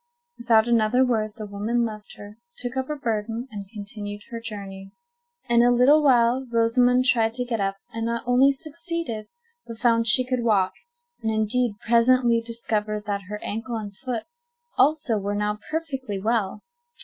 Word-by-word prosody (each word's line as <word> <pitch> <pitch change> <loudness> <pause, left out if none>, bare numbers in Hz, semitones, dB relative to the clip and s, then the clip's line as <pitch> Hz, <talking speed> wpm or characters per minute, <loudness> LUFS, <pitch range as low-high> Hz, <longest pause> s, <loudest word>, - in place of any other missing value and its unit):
Without 230 -1 +3
another 235 +2 +3
word 215 -4 0
the 215 - -7
woman 215 +4 -1
left 215 -2 -8
her, 205 +2 -12 0.2
took 245 +1 -3
up 265 0 -2
her 300 - -3
burden, 230 0 -3
and 200 -2 -8
continued 205 -1 -6
her 230 - -4
journey. 195 -3 -8 0.5
In 235 0 +4
a 240 - +5
little 250 +5 +5
while 250 -2 +4
Rosamond 245 +2 +3
tried 230 -3 +2
to 250 0 -2
get 235 -2 -2
up, 195 0 -1 0.2
and 225 0 -2
not 235 0 -2
only 250 +3 +5
succeeded, 315 -5 -5 0.4
but 230 - -8
found 230 -1 +2
she 255 +3 +5
could 250 -1 -1
walk, 200 -5 +2 0.5
and, 220 - -1
indeed, 220 +1 +1
presently 235 0 +4
discovered 215 -2 -3
that 200 -2 -3
her 210 - -4
ankle 230 +3 -4
and 205 -3 -6
foot 245 -1 -4 0.5
also 265 -5 +3
were 200 +1 -3
now 210 0 -1
perfectly 270 -10 -3
well. 215 -1 -1
230 Hz, 165 wpm, -24 LUFS, 210-250 Hz, 0.5 s, a